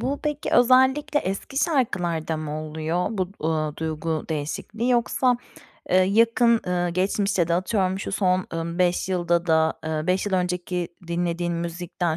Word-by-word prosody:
bu 280 Hz, +2 st, -2 dB
peki 295 Hz, -1 st, -2 dB
özellikle 260 Hz, +4 st, +4 dB
eski 195 Hz, +8 st, -5 dB
şarkılarda 175 Hz, -, 0 dB
mı 155 Hz, 0 st, -4 dB
oluyor, 160 Hz, +3 st, -2 dB
bu, 190 Hz, -5 st, -2 dB, 0.2 s
ııı, 155 Hz, -2 st, -1 dB
duygu 160 Hz, 0 st, -3 dB
değişikliği, 210 Hz, +11 st, -2 dB
yoksa, 245 Hz, +1 st, +2 dB, 0.5 s
eee, 185 Hz, -, +4 dB
yakın, 230 Hz, +4 st, +4 dB
eee, 175 Hz, -1 st, 0 dB
geçmişte 190 Hz, 0 st, +1 dB
de 170 Hz, -, +2 dB
atıyorum, 190 Hz, +1 st, 0 dB
şu 195 Hz, -, -5 dB
son, 185 Hz, -2 st, +1 dB
ımm, 170 Hz, +1 st, -3 dB
5 180 Hz, +1 st, +1 dB
yılda 175 Hz, -1 st, +1 dB
da 160 Hz, -1 st, +3 dB
ııı, 155 Hz, +1 st, -2 dB
5 185 Hz, +2 st, +1 dB
yıl 205 Hz, -, -3 dB
önceki 180 Hz, -1 st, -1 dB, 0.2 s
dinlediğin 170 Hz, 0 st, -1 dB
müzikten 170 Hz, 0 st, -3 dB
180 Hz, 150 wpm, -24 LUFS, 165-210 Hz, 0.5 s, özellikle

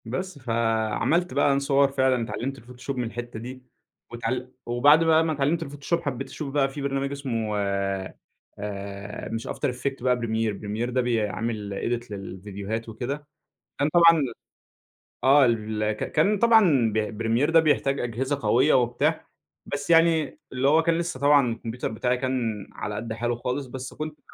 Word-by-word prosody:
بس 145 Hz, +8 st, -4 dB
فعملت 115 Hz, +8 st, 0 dB
بقى 140 Hz, +1 st, +3 dB
أنا 140 Hz, -, +2 dB
صور 140 Hz, 0 st, +3 dB
فعلًا، 130 Hz, -3 st, +2 dB
اتعلمت 135 Hz, +4 st, -4 dB
الفوتوشوب 125 Hz, +2 st, -7 dB
من 125 Hz, -, 0 dB
الحتة 120 Hz, -1 st, -6 dB
دي، 125 Hz, +2 st, -8 dB, 0.5 s
واتعـل 125 Hz, +2 st, -3 dB
وبعد 145 Hz, +7 st, +5 dB
بقى 160 Hz, 0 st, +4 dB
ما 160 Hz, -, 0 dB
اتعلمت 150 Hz, +4 st, 0 dB
الفوتوشوب، 145 Hz, +4 st, -2 dB
حبّيت 135 Hz, -4 st, -4 dB
أشوف 135 Hz, +1 st, -6 dB
بقى 140 Hz, -2 st, +2 dB
في 140 Hz, +1 st, -7 dB
برنامج 140 Hz, 0 st, -1 dB
اسمه 115 Hz, -7 st, -2 dB, 1.0 s
آآ، 100 Hz, 0 st, -6 dB
مش 115 Hz, 0 st, -4 dB
after -, -, -2 dB
effect 135 Hz, +1 st, -4 dB
بقى 125 Hz, -1 st, +3 dB
premier 110 Hz, -3 st, -2 dB
،premier 110 Hz, +3 st, -3 dB
ده 125 Hz, +1 st, +1 dB
بيعمل 110 Hz, -2 st, -1 dB
edit 120 Hz, +2 st, -3 dB
للفيديوهات 100 Hz, +3 st, -5 dB
وكده، 135 Hz, +6 st, -5 dB, 0.5 s
فأنا 145 Hz, -, +2 dB
طبعًا 165 Hz, -3 st, +6 dB, 1.0 s
آه، 135 Hz, +1 st, +7 dB
ال 110 Hz, -2 st, 0 dB
ك 105 Hz, -, -4 dB
كان 200 Hz, +7 st, +3 dB
طبعًا 190 Hz, -, +5 dB
ب 110 Hz, 0 st, -2 dB
premier 115 Hz, +7 st, +2 dB
ده 165 Hz, 0 st, +6 dB
بيحتاج 140 Hz, -3 st, +1 dB
أجهزة 130 Hz, +4 st, -2 dB
قوية 125 Hz, +7 st, +4 dB
وبتاع، 120 Hz, -1 st, +1 dB, 0.4 s
بس 145 Hz, +2 st, -4 dB
يعني 165 Hz, -3 st, +4 dB
اللي 130 Hz, +2 st, +1 dB
هو 160 Hz, +3 st, +5 dB
كان 165 Hz, 0 st, +1 dB
لسه 170 Hz, -6 st, -3 dB
طبعًا 140 Hz, -4 st, +4 dB
الكمبيوتر 115 Hz, +1 st, -4 dB
بتاعي 125 Hz, +3 st, 0 dB
كان 125 Hz, -5 st, -2 dB
على 105 Hz, -, -5 dB
قد 110 Hz, +2 st, -4 dB
حاله 120 Hz, +1 st, -1 dB
خالص 125 Hz, +3 st, -3 dB
بس 130 Hz, +1 st, -7 dB
كنت 155 Hz, 0 st, -5 dB
ب -, -, -35 dB
125 Hz, 165 wpm, -25 LUFS, 115-145 Hz, 1.0 s, آه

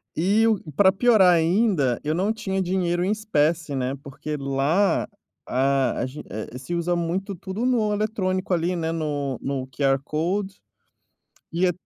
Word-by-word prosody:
E 200 Hz, +7 st, +3 dB
o 220 Hz, -3 st, +2 dB, 0.2 s
pra 190 Hz, +2 st, +6 dB
piorar 195 Hz, -3 st, +5 dB
ainda, 165 Hz, -, +2 dB
eu 150 Hz, -, 0 dB
não 190 Hz, +6 st, +1 dB
tinha 195 Hz, -4 st, -2 dB
dinheiro 175 Hz, -1 st, 0 dB
em 195 Hz, -, +1 dB
espécie, 165 Hz, -7 st, 0 dB
né, 130 Hz, 0 st, -1 dB
porque 150 Hz, +2 st, -5 dB
lá, 140 Hz, +8 st, +1 dB, 0.4 s
ah, 135 Hz, -1 st, +2 dB
a -, -, 0 dB
gen 130 Hz, +4 st, -8 dB
eh, 110 Hz, +4 st, -6 dB
se 170 Hz, +6 st, -4 dB
usa 170 Hz, +1 st, 0 dB
muito 180 Hz, +4 st, -2 dB
tudo 190 Hz, +6 st, -4 dB
no 230 Hz, -5 st, +2 dB
eletrônico, 195 Hz, -3 st, -1 dB
ali, 175 Hz, +1 st, 0 dB
né, 165 Hz, -1 st, -2 dB
no 145 Hz, -5 st, -2 dB
no 135 Hz, -1 st, -3 dB
QR 135 Hz, 0 st, +1 dB
Code, 190 Hz, +7 st, -2 dB, 0.9 s
e 175 Hz, +2 st, +2 dB
é 180 Hz, -, +2 dB
175 Hz, 160 wpm, -24 LUFS, 145-195 Hz, 0.9 s, pra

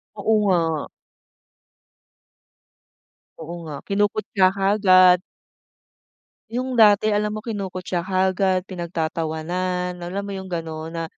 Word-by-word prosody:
Oo 215 Hz, +2 st, +1 dB, 0.2 s
nga. 165 Hz, -4 st, 0 dB, 2.5 s
Oo 165 Hz, +1 st, -8 dB
nga, 155 Hz, -3 st, -7 dB
kinukutya 205 Hz, -1 st, 0 dB
kaagad. 185 Hz, -2 st, +5 dB, 1.3 s
Yung 255 Hz, +2 st, -3 dB
dati 215 Hz, -2 st, +5 dB
alam 210 Hz, 0 st, 0 dB
mo 215 Hz, -, -4 dB
kinukutya 185 Hz, -4 st, -3 dB
kaagad, 190 Hz, 0 st, +1 dB
pinagtatawanan, 175 Hz, +1 st, -3 dB
alam 190 Hz, +3 st, -4 dB
mo 200 Hz, -, -5 dB
yung 190 Hz, -1 st, -7 dB
ganun 160 Hz, -1 st, -5 dB
na 165 Hz, 0 st, -4 dB
185 Hz, 95 wpm, -22 LUFS, 170-200 Hz, 2.5 s, kaagad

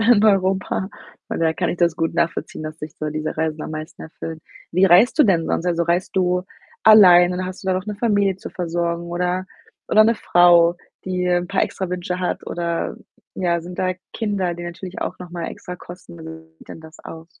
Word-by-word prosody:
in 225 Hz, -2 st, +5 dB
Europa. 190 Hz, -1 st, +1 dB, 0.4 s
Von -, -, -3 dB
daher 160 Hz, -1 st, +2 dB
kann -, -, -1 dB
ich -, -, -2 dB
das 170 Hz, -2 st, +2 dB
gut 165 Hz, -1 st, -2 dB
nachvollziehen, 165 Hz, -1 st, -2 dB
dass 155 Hz, 0 st, -7 dB
dich 150 Hz, -1 st, -8 dB
so 155 Hz, 0 st, -3 dB
diese 155 Hz, +1 st, -4 dB
Reisen 160 Hz, -1 st, -2 dB
am -, -, -6 dB
meisten 155 Hz, +1 st, -7 dB
erfüllen. 160 Hz, 0 st, -8 dB, 0.3 s
Wie 185 Hz, +3 st, +4 dB
reist 200 Hz, -, +5 dB
du 300 Hz, -, +7 dB
denn 175 Hz, -7 st, +2 dB
sonst? 175 Hz, -, -1 dB
Also, 170 Hz, -1 st, +1 dB
reist 175 Hz, +3 st, -1 dB
du 180 Hz, -1 st, +2 dB, 0.4 s
allein 180 Hz, -5 st, +8 dB
oder 185 Hz, +1 st, -3 dB
hast 185 Hz, +1 st, -7 dB
du -, -, -10 dB
da 185 Hz, -, +2 dB
noch 185 Hz, +1 st, -2 dB
'ne 210 Hz, -, -3 dB
Familie 200 Hz, -4 st, +1 dB
zu -, -, -8 dB
versorgen 170 Hz, -1 st, -2 dB
oder 180 Hz, +2 st, -2 dB, 0.4 s
oder 215 Hz, -, +6 dB
'ne 230 Hz, +1 st, +3 dB
Frau, 175 Hz, -3 st, +5 dB, 0.3 s
die 180 Hz, -1 st, -2 dB
'n 175 Hz, 0 st, +1 dB
paar 195 Hz, -, +1 dB
extra 190 Hz, -2 st, -3 dB
Wünsche 180 Hz, 0 st, -3 dB
hat? 180 Hz, -, -3 dB
Oder, 170 Hz, -1 st, -3 dB, 0.4 s
ja, 175 Hz, -2 st, 0 dB
sind 175 Hz, +2 st, -10 dB
da 185 Hz, 0 st, +1 dB, 0.2 s
Kinder, 200 Hz, -5 st, -1 dB
die 175 Hz, -, -8 dB
natürlich 175 Hz, +2 st, -7 dB
auch 185 Hz, -, -5 dB
noch 180 Hz, -, -9 dB
mal 170 Hz, -1 st, -5 dB
extra 180 Hz, -, -8 dB
kosten? 175 Hz, -1 st, -12 dB
Wie 160 Hz, 0 st, -11 dB
sieht -, -, -18 dB
denn -, -, -9 dB
das 160 Hz, 0 st, -14 dB
aus? 165 Hz, +1 st, -12 dB
175 Hz, 215 wpm, -21 LUFS, 170-185 Hz, 0.4 s, allein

